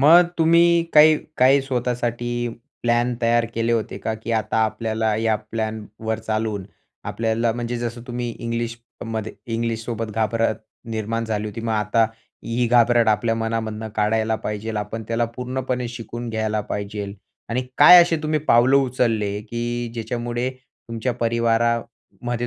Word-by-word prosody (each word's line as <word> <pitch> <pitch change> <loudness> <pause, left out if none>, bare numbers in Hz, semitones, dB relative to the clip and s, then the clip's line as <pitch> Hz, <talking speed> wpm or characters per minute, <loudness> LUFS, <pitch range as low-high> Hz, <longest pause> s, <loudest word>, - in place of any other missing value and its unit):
मग 170 +5 +7
तुम्ही 170 +1 +5
काही 155 +1 +8 0.2
काही 135 +2 +5
स्वतःसाठी 120 -2 -2 0.3
प्लॅन 120 +1 +2
तयार 115 0 +3
केले 115 +1 0
होते 110 -4 -1
का, 110 +1 -2
की 110 +1 -7
आता 110 0 0
आपल्याला 110 0 -1
या 110 0 +1
प्लॅनवर 110 0 -4
चालून 110 -3 -2 0.4
आपल्याला 115 0 0
म्हणजे 120 0 -3
जसं 120 0 -4
तुम्ही 120 -1 -3
इंग्लिशमध्ये 115 -1 -5 0.2
इंग्लिश 115 0 -2
सोबत 115 -2 -4
घाबरत 110 0 +1 0.3
निर्माण 115 +1 -2
झाली 110 -1 -2
होती 105 +2 -7
मग 115 0 -2
आता 105 +1 +2 0.4
ही 120 +1 0
घाबरट 120 -1 +4
आपल्या 115 +1 +2
मनामधनं 110 -1 -3
काढायला 110 +1 +1
पाहिजे 105 +1 -3
आपण 105 +2 -4
त्याला 115 +1 +1
पूर्णपणे 125 -1 -3
शिकून 120 0 -6
घ्यायला 110 -1 -1
पाहिजे 100 -1 -5 0.3
आणि 125 +2 -1 0.2
काय 180 0 +10
असे 170 -1 +1
तुम्ही 155 0 +1
पावलं 130 -2 +4
उचलले, 115 -6 +1
की 120 +2 -3
ज्याच्यामुळे 120 +2 -2
तुमच्या 125 -2 -6
परिवारामध्ये 115 +1 -1
115 Hz, 135 wpm, -22 LUFS, 110-120 Hz, 0.4 s, काय